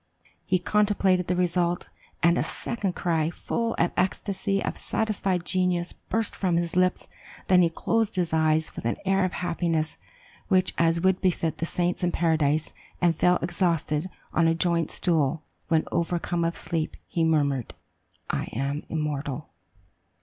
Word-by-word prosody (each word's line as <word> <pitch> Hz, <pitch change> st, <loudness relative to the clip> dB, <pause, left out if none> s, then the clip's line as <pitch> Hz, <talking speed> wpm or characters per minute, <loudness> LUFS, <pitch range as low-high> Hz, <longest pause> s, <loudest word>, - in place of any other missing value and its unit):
He 185 Hz, -, +3 dB
contemplated 195 Hz, -1 st, +2 dB
the 180 Hz, -, +1 dB
result, 175 Hz, -1 st, 0 dB, 0.3 s
and 170 Hz, +1 st, +5 dB
a -, -, +1 dB
second 200 Hz, -6 st, -3 dB
cry, 160 Hz, -2 st, +1 dB
full 230 Hz, +6 st, -2 dB
of 170 Hz, -, +1 dB
the -, -, -2 dB
ecstasy 195 Hz, +1 st, 0 dB
of -, -, -2 dB
satisfied 195 Hz, -5 st, -1 dB
genius, 180 Hz, -1 st, 0 dB
burst 225 Hz, -1 st, -2 dB
from 180 Hz, -3 st, +1 dB
his 170 Hz, -1 st, -1 dB
lips; 185 Hz, 0 st, +2 dB, 0.4 s
then 185 Hz, -1 st, +5 dB
he 170 Hz, -, +4 dB
closed 225 Hz, +6 st, 0 dB
his 175 Hz, -3 st, 0 dB
eyes 160 Hz, 0 st, +2 dB
with -, -, -7 dB
an 115 Hz, -, 0 dB
air 195 Hz, 0 st, +3 dB
of 185 Hz, -, -1 dB
happiness 170 Hz, -3 st, -1 dB, 0.5 s
such 185 Hz, -2 st, +3 dB
as 165 Hz, 0 st, +3 dB
would 190 Hz, 0 st, +2 dB
befit 170 Hz, -3 st, 0 dB
the 165 Hz, -, -1 dB
saints 175 Hz, +1 st, -1 dB
in 175 Hz, -, +2 dB
paradise, 155 Hz, -3 st, +1 dB, 0.3 s
and 175 Hz, -2 st, +3 dB
fell 180 Hz, +3 st, +4 dB
exhausted 170 Hz, -2 st, 0 dB, 0.2 s
on 165 Hz, 0 st, +3 dB
a 165 Hz, -, +3 dB
joint 170 Hz, -1 st, +1 dB
stool; 155 Hz, -3 st, +1 dB, 0.2 s
when 160 Hz, -1 st, +3 dB
overcome 170 Hz, 0 st, 0 dB
of 165 Hz, 0 st, 0 dB
sleep, 160 Hz, -2 st, -2 dB
he 165 Hz, -, -1 dB
murmured, 145 Hz, -6 st, +1 dB, 0.6 s
'I -, -, -1 dB
am 140 Hz, +4 st, -2 dB
immortal! 150 Hz, -2 st, -3 dB
170 Hz, 155 wpm, -26 LUFS, 160-185 Hz, 0.6 s, and